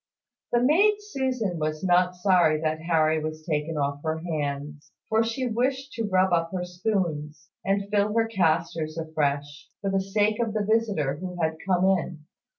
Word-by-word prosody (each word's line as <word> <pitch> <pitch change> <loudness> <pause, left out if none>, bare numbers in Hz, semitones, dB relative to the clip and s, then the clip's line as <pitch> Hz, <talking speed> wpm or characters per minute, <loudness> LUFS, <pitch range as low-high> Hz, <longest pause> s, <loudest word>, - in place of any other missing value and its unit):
The 240 0 +3
maid 385 +11 +5
Susan 260 - -2
was 155 +1 -2
not 180 0 +3
sorry 180 -4 +3
that 155 0 -1
Harry 160 -2 +2
was 155 0 -5
taken 155 0 -2
off 140 0 -1
her 160 0 -1
hands; 145 -3 -4 0.2
for 225 0 +3
she 230 +3 -2
wished 260 +4 -1
to 225 -3 -3
rub 185 -1 +3
up 165 -1 +1
her 180 -1 -2
spoons, 175 -5 -3
and 195 +1 0
fill 205 0 +2
her 230 0 +3
castors 165 -5 0
afresh, 145 -3 -2
for 195 -1 -2
the 195 0 +1
sake 210 +3 +1
of 225 -2 -1
the 210 -1 0
visitor 205 -11 +1
who 180 +1 -6
had 160 -1 0
come 185 -1 +3
in. 175 -5 0
180 Hz, 170 wpm, -26 LUFS, 155-210 Hz, 0.2 s, maid